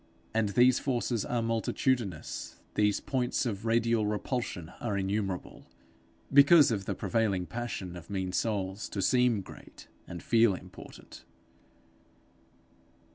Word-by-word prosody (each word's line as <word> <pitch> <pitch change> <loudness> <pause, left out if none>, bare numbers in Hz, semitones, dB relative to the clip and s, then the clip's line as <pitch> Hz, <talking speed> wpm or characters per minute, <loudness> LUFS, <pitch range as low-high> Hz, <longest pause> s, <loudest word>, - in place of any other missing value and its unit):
And 110 -2 +1
these 125 +5 +4
forces 120 -4 -1
are 120 -1 -1
multitudinous, 115 - -2
these 105 -1 +2
points 130 0 -1
of 110 -1 -3
radial 115 -1 +2
repulsion 105 -5 -3
are 105 -4 -2
innumerable, 95 -1 -3 0.7
because 140 0 +7
of 100 -4 -2
the - - -2
prevailing 105 -6 0
passion 105 -6 -5
of 85 0 -11
mean 95 -2 -2
souls 100 0 -2
to 100 - -3
seem 125 -2 +3
great, - - -14 0.2
and 85 -1 -8
feel 115 -4 +4
important. - - -12
110 Hz, 120 wpm, -30 LUFS, 95-120 Hz, 0.7 s, because